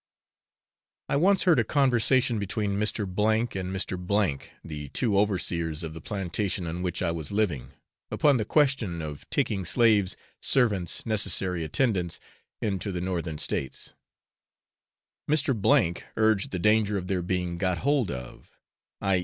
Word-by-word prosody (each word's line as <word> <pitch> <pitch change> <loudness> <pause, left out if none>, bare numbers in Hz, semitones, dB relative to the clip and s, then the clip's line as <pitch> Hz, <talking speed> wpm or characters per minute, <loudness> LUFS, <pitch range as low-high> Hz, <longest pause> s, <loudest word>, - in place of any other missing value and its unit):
I - - +1
once 190 +7 +4
heard 175 -4 +4
a - - +4
conversation 130 -3 +2
between 100 0 -2
Mr. 105 +1 0
O 100 +2 0 0.3
and 95 0 -4
Mr. 95 -4 0
K, - - -16
the 75 -3 -7
two 110 - 0
overseers 85 -5 0
of 80 -1 -5
the 80 - -9
plantation 95 0 -2
on 85 +2 -4
which 90 0 -2
I 85 - +1
was 80 -3 -4
living, 100 - 0 0.4
upon 145 -3 +3
the 110 - 0
question 115 - +1
of 75 -2 -8
taking 100 -3 0
slaves, 105 -1 +3 0.2
servants, 105 -10 +1
necessary 95 -5 0
attendants, 90 - 0 0.4
into 100 -1 -1
the 90 - -3
northern 85 -3 -3
states; 65 -3 -4 1.4
Mr. 145 -3 +3
O 85 0 +3 0.2
urged 110 -3 +2
the 90 - -3
danger 105 +2 +3
of 90 - -4
their 95 -2 0
being 90 -1 -2
'got 90 -2 +1
hold 140 -3 +1
of,' 60 -2 -8 0.5
i. 95 -2 +2
95 Hz, 145 wpm, -27 LUFS, 85-110 Hz, 1.4 s, once